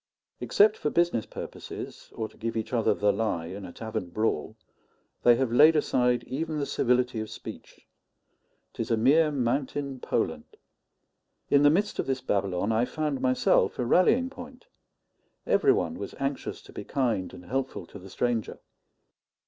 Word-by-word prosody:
Except 425 +1 +4
for - - -1
business 170 -10 +1
purposes, - - -8
or 110 - -3
to - - -21
give 115 0 -4
each 110 +2 -4
other 115 -3 +2
the 105 0 +2
lie 100 -7 -1
in 95 +3 -7
a 90 - -8
tavern 110 -4 -5
brawl, 110 +2 -1 0.6
they 120 - +6
have 130 -1 0
laid 155 +6 +7
aside 125 -4 +2
even 155 +3 -3
the 145 - -1
civility 125 -2 +1
of 110 0 -4
speech. - - -10 0.9
'Tis - - -4
a 115 - +2
mere 150 +7 +4
mountain 135 +1 -2
Poland. 80 -11 -2 0.9
In 140 - +6
the 145 - +7
midst 200 +7 0
of - - -1
this 135 -1 0
Babylon 100 -4 -1
I 110 +1 +2
found 150 +1 -2
myself 130 0 +2
a 125 - -1
rallying 240 - +3
point; 255 -1 -11 0.8
every 410 - +4
one 380 - -1
was - - -6
anxious 135 0 -3
to - - -15
be - - -6
kind 120 -9 -1
and 90 - -12
helpful 135 +5 -3
to 100 - -12
the 95 +1 -12
stranger. 120 +1 -1
125 Hz, 165 wpm, -27 LUFS, 110-150 Hz, 0.9 s, laid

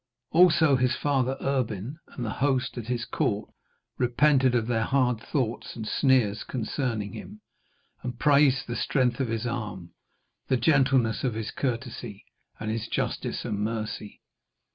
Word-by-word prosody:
Also 160 -4 +5
his 125 0 +2
father 135 -2 0
Erbin 130 - -2
and 120 - -6
the 110 - -2
host 130 -1 0
at 120 -3 -6
his 120 -1 -2
court 105 0 -1 0.5
repented 130 +1 +3
of 115 -2 +2
their 115 -1 0
hard 125 -4 +2
thoughts 120 -2 -3
and 110 -2 -5
sneers 125 -7 +2
concerning 115 -4 -3
him, 215 +1 -9 0.6
and 125 -1 -5
praised 140 -1 +4
the 120 - -4
strength 125 -3 +1
of 135 - 0
his 115 +1 -2
arm, 105 -7 -4 0.5
the 130 - +2
gentleness 130 -3 +3
of 125 -4 0
his 110 -1 -4
courtesy, 120 -4 -4 0.3
and 110 0 -3
his 115 0 -3
justice - - -2
and 100 - -2
mercy. 110 -1 -4
125 Hz, 145 wpm, -27 LUFS, 110-135 Hz, 0.6 s, Also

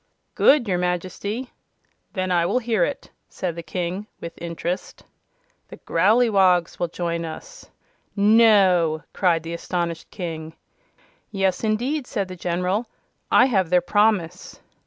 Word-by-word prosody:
"Good, 275 -5 +4
your 180 -2 0
Majesty." 185 +7 -3 0.6
"Then 185 -2 -2
I 175 -1 +3
will - - +1
hear 225 -6 +1
it," - - -4 0.2
said 175 -3 -4
the 170 - -5
King, 180 +4 -4
with 170 0 -7
interest. 170 +2 -5 0.6
"The - - -11
Growleywogs 190 -2 +2
will 175 - 0
join 170 0 -3
us." 165 - -9 0.5
"No!" 200 -7 +4
cried 170 -4 +1
the 165 +1 -6
astonished 170 -1 -3
King. 160 -3 -6 0.7
"Yes, 195 -2 -1
indeed," 245 +6 -1
said 195 -2 -3
the 185 - -7
General. 180 +6 -1 0.4
"I - - +6
have 195 -9 +1
their 180 0 +4
promise." 190 -2 0
185 Hz, 130 wpm, -23 LUFS, 170-210 Hz, 0.7 s, I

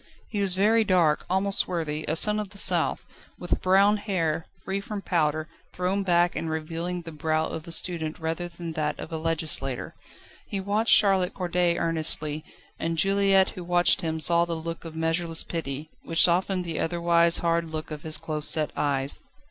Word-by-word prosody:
He 205 - -2
was 190 -2 +3
very 220 +4 +3
dark, 175 -7 +2
almost 195 +2 +2
swarthy 155 -3 -2
a 155 - 0
son 210 +5 +4
of 210 -2 -4
the 200 - -14
South, - - +1 0.3
with - - -2
brown 195 +3 +4
hair, 170 -6 -2 0.2
free 195 +1 -2
from 200 0 -6
powder, 155 -2 0 0.3
thrown 185 +2 -1
back 175 -2 +2
and 165 - -3
revealing 165 +3 -4
the 165 - -8
brow 155 +1 -1
of 160 +1 -6
a - - -7
student 165 -2 0
rather 165 +2 -3
than 170 -1 -7
that 155 -1 -2
of - - -8
a 160 - -3
legislator. 155 -5 0 0.5
He 200 - -3
watched 205 +4 +3
Charlotte 195 -3 +2
Corday 175 -2 0
earnestly, 155 -2 0 0.4
and 165 0 -2
Juliette 195 +2 +3
who 180 - -8
watched 175 0 +3
him 160 -1 -2
saw 170 +1 +4
the 170 -1 -3
look 165 +1 -6
of 160 -1 -8
measureless 165 +1 -1
pity, 155 -2 -5
which 165 0 +2
softened 180 +1 +2
the 165 -2 -3
otherwise 170 0 +2
hard 170 0 0
look 155 0 -6
of 150 -1 -6
his 155 -1 0
close 155 -1 0
set 155 -2 0
eyes. 140 -1 +1
170 Hz, 180 wpm, -26 LUFS, 160-185 Hz, 0.5 s, son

